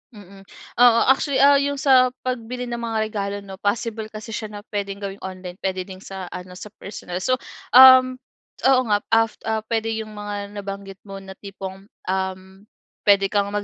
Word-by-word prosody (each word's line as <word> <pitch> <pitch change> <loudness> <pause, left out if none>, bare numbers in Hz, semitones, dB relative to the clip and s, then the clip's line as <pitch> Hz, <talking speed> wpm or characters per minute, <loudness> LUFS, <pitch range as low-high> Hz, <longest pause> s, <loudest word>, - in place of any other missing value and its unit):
Mm, 195 -2 -14 0.3
oo 240 -1 +6
actually, 270 +1 +3
ah, 285 +1 +7
yung 280 0 0
sa 260 -3 +5
pagbili 250 0 -4
ng 240 - -3
mga 230 -1 -3
regalo 200 -2 -3
'no, 195 -1 -10
possible 220 +2 -2
kasi 215 +1 -7
siya 215 -2 -5
na 205 - -7
puwedeng 200 -1 -4
gawing 200 0 -7
online 185 -1 -7
pwede 185 -1 -2
din 190 0 -11
sa 190 -2 -7
ano 180 0 -8
sa 180 +3 -9
personal. 195 -3 -8
So, 255 +3 +1 0.3
um, 255 0 +8 0.5
oo 265 -1 +5
nga 205 - +4
af 225 0 +3 0.2
ah, 220 -1 -1
puwede 225 0 -2 0.2
yung 215 - -12
mga 205 -1 -6
nabanggit 195 -1 -7
mo 195 - -8
na 190 - -10
tipong, 195 -1 -9 0.2
um, 190 +1 -4 0.4
puwede 200 -1 +4
kang 200 -1 +1
mag 205 - -1
205 Hz, 180 wpm, -22 LUFS, 195-235 Hz, 0.5 s, um